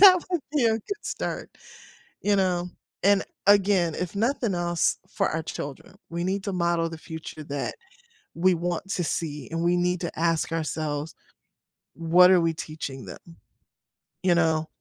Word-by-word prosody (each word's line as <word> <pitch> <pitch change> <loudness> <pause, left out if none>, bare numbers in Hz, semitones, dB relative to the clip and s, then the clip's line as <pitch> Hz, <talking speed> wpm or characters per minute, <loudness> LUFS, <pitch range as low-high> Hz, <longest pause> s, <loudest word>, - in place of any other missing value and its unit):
That 370 -3 +9
would 350 -4 +1
be 285 -5 +2
a 225 - +5
good 315 - -4
start, - - -4 0.7
you 205 0 +3
know, 180 -2 +1 0.3
and 200 0 +5 0.2
again, 195 -5 +4
if 180 +2 -4
nothing 230 -2 +1
else 175 -1 +1
for - - +1
our 160 +1 -2
children, 145 +4 -7 0.2
we 170 +1 -2
need 190 +1 -1
to 200 - -2
model 170 -2 +1
the 165 - -7
future 160 -2 -8
that 145 -1 -3 0.6
we 180 +2 +3
want 175 +2 -2
to 175 - 0
see 150 -2 -3
and 165 +1 -1
we 175 +1 +3
need 180 0 +1
to 170 -2 -4
ask 165 -1 +1
ourselves, 155 -2 -2 0.8
"What 175 +3 +6
are 180 -2 +6
we 165 -1 +1
teaching 155 -4 -6
them?" - - -8 1.1
You 175 -2 +4
know? 160 -2 +2
175 Hz, 160 wpm, -26 LUFS, 160-190 Hz, 1.1 s, That